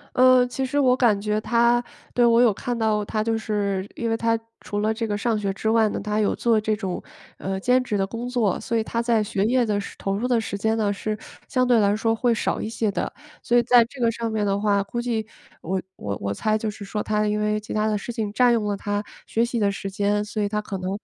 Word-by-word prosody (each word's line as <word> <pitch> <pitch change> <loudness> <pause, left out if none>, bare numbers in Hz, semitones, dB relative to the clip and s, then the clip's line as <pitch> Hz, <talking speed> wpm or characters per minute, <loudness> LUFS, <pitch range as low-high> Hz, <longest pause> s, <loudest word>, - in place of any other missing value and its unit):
呃， 255 0 +6
其 255 +2 -3
实 260 +3 -2
我 255 -3 +4
感 230 -6 +3
觉 210 +1 0
他 235 +2 +3 0.3
对， 245 - +4
我 235 0 +5
有 235 -4 +5
看 240 +4 -3
到 215 -2 +1
他 215 +1 -1
就 225 0 0
是 200 -3 -2
因 230 - -2
为 225 - +1
他 230 0 +1 0.2
除 205 - -4
了 215 +1 +1
这 225 +1 -3
个 205 -1 -1
上 220 +1 0
学 200 -2 -1
之 220 +3 -2
外 225 -1 +4
呢， - - -3
他 210 - -5
还 210 - +1
有 210 - +1
做 230 -2 +2
这 215 0 0
种， 190 -4 -4 0.4
呃， 190 0 -3
兼 250 +5 +3
职 230 -5 -2
的 195 - +1
工 230 +5 -5
作， 240 -6 0
所 230 - -2
以 225 - +1
他 230 +1 -2
在 230 -2 +2
学 205 -1 -1
业 245 +2 +3
的 210 -2 0
时 200 - -7
投 195 - -2
入 240 +4 -1
的 245 -2 +2
时 200 - -4
间 220 +2 0
呢， 210 -2 +1
是 215 +1 -3 0.3
相 255 -2 +1
对 245 -2 +4
来 205 -1 +3
说 225 +1 +1
会 235 +1 +2
少 - - -1
一 - - -3
些 220 -1 -1
的。 - - -2 0.3
所 240 - +2
以 240 - +4
在 240 0 +6
这 250 +2 -11
个 230 -1 +3
上 230 0 -3
面 215 -1 -1
的 200 0 +1
话 200 -1 +2
估 235 +4 -5
计 230 -3 -1 0.4
我 185 +2 -2
我 100 -1 -4
我 100 0 -2
猜 215 - 0
就 220 0 -2
是 210 0 -8
说 210 +1 -3
他 210 0 0
因 210 0 0
为 210 0 +1
其 210 - -8
它 215 0 +1
的 215 -1 +1
事 205 - -6
情 220 -3 -3
占 245 +2 +4
用 230 -3 +1
了 205 -1 0
他 205 +1 -2 0.3
学 230 +1 +1
习 235 0 -2
的 200 -2 +2
时 195 0 -5
间， 205 +1 0
所 210 0 -3
以 205 - 0
他 210 0 -1
可 200 -2 -5
能 185 0 -3
215 Hz, 295 characters per minute, -24 LUFS, 205-235 Hz, 0.4 s, 呃